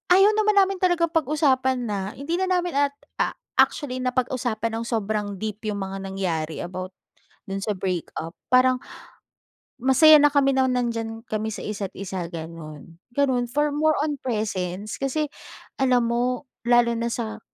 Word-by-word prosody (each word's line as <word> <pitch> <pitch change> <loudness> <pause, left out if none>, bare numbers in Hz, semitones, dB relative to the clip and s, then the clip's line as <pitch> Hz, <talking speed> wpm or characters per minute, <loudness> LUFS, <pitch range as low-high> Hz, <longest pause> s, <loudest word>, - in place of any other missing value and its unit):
ayaw 395 +2 +6
naman 425 -1 +3
namin 390 -1 +4
talagang 350 -3 +2
pag-usapan 275 -4 +2
na, 210 -4 -2 0.2
hindi 330 +6 -2
na 375 - +1
namin 355 -2 0
at, 280 - -16 0.3
a - - +1 0.3
actually, 255 -4 +2
napag-usapan 250 -3 -1
nang 230 - -4
sobrang 210 -3 -1
deep 215 +2 -5
yung 205 -2 -2
mga 195 0 -4
nangyari 170 -5 -2
about 185 +1 -6 0.5
dun 195 0 -4
sa 210 - -1
break 180 -3 -2
up. 165 +1 -5 0.2
Parang 255 0 +4 1.0
masaya 300 +4 +7
na 295 - +6
kami 275 -1 +4
nang 260 -1 +3
nandiyan 230 -2 -2
kami 215 0 -2
sa - - -6
isa't 205 -2 -4
isa, 185 -3 -4
gano'n. 165 -1 -9 0.2
Gano'n, 260 -4 +2
for 295 +3 +1
more 310 +1 +3
on 295 -2 -1
presence, 205 -4 -3
kasi 290 +3 0 0.5
alam 250 -2 +3
mo, 245 +3 0 0.2
lalo 240 -1 +5
na 235 - -1
sa 220 -2 -4
240 Hz, 155 wpm, -24 LUFS, 200-280 Hz, 1.0 s, masaya